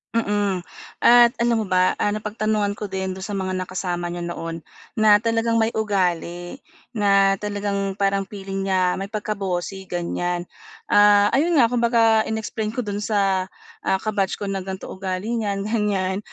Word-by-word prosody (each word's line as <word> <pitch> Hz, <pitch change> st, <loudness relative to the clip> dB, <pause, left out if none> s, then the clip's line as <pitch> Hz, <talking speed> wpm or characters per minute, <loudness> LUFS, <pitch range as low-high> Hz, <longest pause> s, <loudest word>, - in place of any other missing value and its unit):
Mm, 205 Hz, -4 st, 0 dB, 0.4 s
at 240 Hz, 0 st, +7 dB
alam 235 Hz, -2 st, +2 dB
mo -, -, -6 dB
ba, 185 Hz, 0 st, +3 dB
ah, 205 Hz, -, 0 dB
napagtanungan 210 Hz, -1 st, -1 dB
ko -, -, -8 dB
din 190 Hz, -1 st, -3 dB
do'n 190 Hz, -, -8 dB
sa 205 Hz, -, -5 dB
mga 190 Hz, -2 st, -2 dB
nakasama 175 Hz, -2 st, -3 dB
niya 175 Hz, -, -5 dB
noon 165 Hz, -1 st, -5 dB, 0.3 s
na 215 Hz, -1 st, +4 dB
talagang 230 Hz, 0 st, +1 dB
may 225 Hz, 0 st, +2 dB
ugali 180 Hz, -2 st, -2 dB, 0.3 s
na 195 Hz, -3 st, +3 dB
talagang 200 Hz, -1 st, -2 dB
parang 195 Hz, -1 st, 0 dB
feeling 195 Hz, -1 st, -5 dB
niya 185 Hz, -1 st, +1 dB
may 195 Hz, -, -4 dB
pagka-bossy 195 Hz, -3 st, -4 dB
ganyan. 175 Hz, 0 st, -2 dB, 0.5 s
Ah, 205 Hz, 0 st, +6 dB
ayun 330 Hz, +5 st, +2 dB
nga 240 Hz, -5 st, +4 dB
kumbaga 230 Hz, -2 st, +3 dB
in-explain 220 Hz, 0 st, -3 dB
ko 250 Hz, -, -1 dB
do'n 205 Hz, -1 st, -3 dB
sa, 195 Hz, -3 st, +1 dB, 0.4 s
ah, 190 Hz, -, +3 dB
ka-batch 205 Hz, -3 st, 0 dB
ko 200 Hz, -1 st, -4 dB
na 195 Hz, -, -2 dB
gan'to 190 Hz, 0 st, -7 dB
ugali 190 Hz, +3 st, -4 dB
niyan 205 Hz, -4 st, -1 dB
ganyan, 200 Hz, -3 st, 0 dB
200 Hz, 160 wpm, -22 LUFS, 190-215 Hz, 0.5 s, at